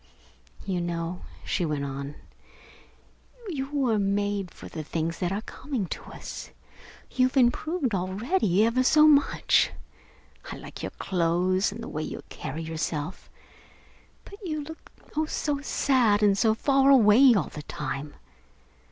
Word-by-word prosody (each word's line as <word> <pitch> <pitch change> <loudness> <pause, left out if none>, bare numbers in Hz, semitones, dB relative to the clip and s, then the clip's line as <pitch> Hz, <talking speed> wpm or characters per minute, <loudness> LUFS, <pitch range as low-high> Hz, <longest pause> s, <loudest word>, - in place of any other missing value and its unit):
You 185 -3 -1
know," 170 +1 -3 0.2
she - - -1
went 150 -3 -1
on, 140 +1 -5 1.3
"you 275 -5 -3
were 260 -7 +1
made 200 -1 0
for - - -12
the 155 - -6
things 165 +2 -3
that 180 0 -1
are 205 +3 -2
coming 260 -7 -4
to - - -5
us. - - -8 0.6
You've 255 +1 +1
improved 265 - +2
already, 200 - +1
ever 230 +3 +2
so 305 +4 +6
much. 290 -2 +4 0.8
I - - -5
like - - -10
your - - -3
clothes 185 +2 0
and 230 +3 -7
the - - -6
way 155 - -4
you - - -6
carry 155 +4 -6
yourself. 160 +1 -4 1.0
But 400 - -12
you 310 -4 -3
look 320 +2 -11 0.2
oh, 310 +1 +1
so 290 -2 -2
sad 245 -7 +2
and 200 -1 +5
so 220 +2 +3
far 275 +3 +3
away 245 0 +7
all 190 - 0
the 150 - -8
time! 145 0 -5
205 Hz, 145 wpm, -27 LUFS, 170-270 Hz, 1.3 s, away